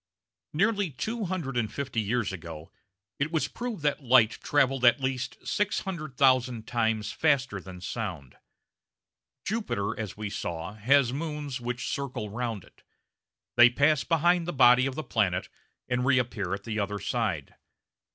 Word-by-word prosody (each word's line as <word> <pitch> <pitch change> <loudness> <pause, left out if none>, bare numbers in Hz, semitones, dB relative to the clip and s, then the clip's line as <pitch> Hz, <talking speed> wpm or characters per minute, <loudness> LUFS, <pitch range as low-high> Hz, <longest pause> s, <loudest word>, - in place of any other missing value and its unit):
Nearly 205 +3 +1
two 215 - -3
hundred 170 -8 -3
and 110 -3 0
fifty 135 -5 -2
years 110 -1 -1
ago 80 -3 -8 0.5
it 140 +3 0
was 160 -2 +1
proved 240 -9 -5
that 145 0 +1
light 120 -4 +5
travelled 135 -3 +2
at 120 +3 +6
least 130 -1 -2
600,000 135 - +1
times 110 -2 0
faster 135 -9 +1
than 90 -1 -10
sound. 90 - -5 1.1
Jupiter, 115 - -1
as 105 -4 -5
we 105 -2 -4
saw, 85 +2 -4
has 125 +4 +3
moons, 150 -3 -4
which 125 +1 -3
circle 130 -7 -4
round 115 -4 -3
it. - - -22 0.8
They 120 0 +9
pass 145 +3 +3
behind 170 +1 +2
the 175 - -2
body 125 0 +6
of 135 - -4
the 155 - -4
planet, 95 -9 0 0.4
and 125 0 0
reappear 120 -7 +1
at - - -10
the 110 -2 -3
other 105 0 -1
side. 100 - -2
125 Hz, 145 wpm, -28 LUFS, 105-145 Hz, 1.1 s, They